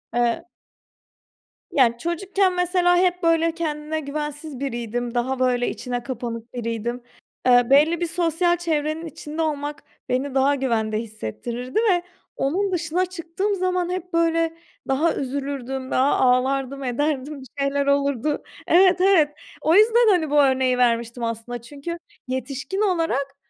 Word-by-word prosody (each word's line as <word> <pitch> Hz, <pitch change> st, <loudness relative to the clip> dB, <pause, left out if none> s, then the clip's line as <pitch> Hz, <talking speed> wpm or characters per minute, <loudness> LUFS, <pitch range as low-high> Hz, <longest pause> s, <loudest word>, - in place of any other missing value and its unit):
Eee 240 Hz, +7 st, +1 dB, 1.3 s
Yani, 255 Hz, -7 st, +3 dB
çocukken 370 Hz, +5 st, 0 dB
mesela, 360 Hz, 0 st, +3 dB
hep 360 Hz, 0 st, +1 dB
böyle 330 Hz, 0 st, +3 dB
kendine 310 Hz, -1 st, -3 dB
güvensiz 295 Hz, -1 st, -5 dB
biriydim, 240 Hz, -2 st, -3 dB
daha 255 Hz, +2 st, 0 dB
böyle 250 Hz, -1 st, +2 dB
içine 245 Hz, -1 st, -4 dB
kapanık 235 Hz, -2 st, -6 dB
biriydim. 235 Hz, 0 st, -3 dB, 0.4 s
Eee, 245 Hz, -1 st, +5 dB
belli 305 Hz, +5 st, +4 dB
bir 345 Hz, -, +1 dB
sosyal 345 Hz, +1 st, +1 dB
çevrenin 315 Hz, -1 st, -1 dB
içinde 310 Hz, 0 st, -6 dB
olmak 295 Hz, -1 st, -3 dB, 0.3 s
beni 260 Hz, +2 st, -1 dB
daha 275 Hz, +2 st, +3 dB
güvende 225 Hz, -5 st, 0 dB
hissettirirdi 235 Hz, -, -4 dB
ve 350 Hz, -1 st, +1 dB, 0.3 s
onun 380 Hz, +9 st, 0 dB
dışına 345 Hz, +1 st, 0 dB
çıktığım 370 Hz, +3 st, -3 dB
zaman, 365 Hz, -1 st, 0 dB
hep 360 Hz, -1 st, -4 dB
böyle, 330 Hz, 0 st, +2 dB, 0.3 s
daha 295 Hz, +5 st, +2 dB
üzülürdüm, 270 Hz, -1 st, -4 dB
daha 265 Hz, +2 st, +3 dB
ağlardım, 265 Hz, +2 st, +1 dB
ederdim, 280 Hz, +2 st, -2 dB
bir 260 Hz, -, -11 dB
şeyler 280 Hz, 0 st, +1 dB
olurdu 280 Hz, 0 st, +1 dB, 0.2 s
Evet, 365 Hz, 0 st, +5 dB
evet, 370 Hz, -6 st, +5 dB, 0.3 s
o 320 Hz, +2 st, +3 dB
yüzden, 455 Hz, +3 st, +6 dB
hani, 350 Hz, -6 st, +2 dB
bu 295 Hz, 0 st, +5 dB
örneği 260 Hz, -2 st, +2 dB
vermiştim 235 Hz, -1 st, +1 dB
aslında, 230 Hz, +1 st, -4 dB
çünkü 290 Hz, +7 st, -7 dB, 0.3 s
yetişkin 260 Hz, -, -3 dB
olarak, 330 Hz, -8 st, 0 dB
285 Hz, 135 wpm, -23 LUFS, 250-335 Hz, 1.3 s, yüzden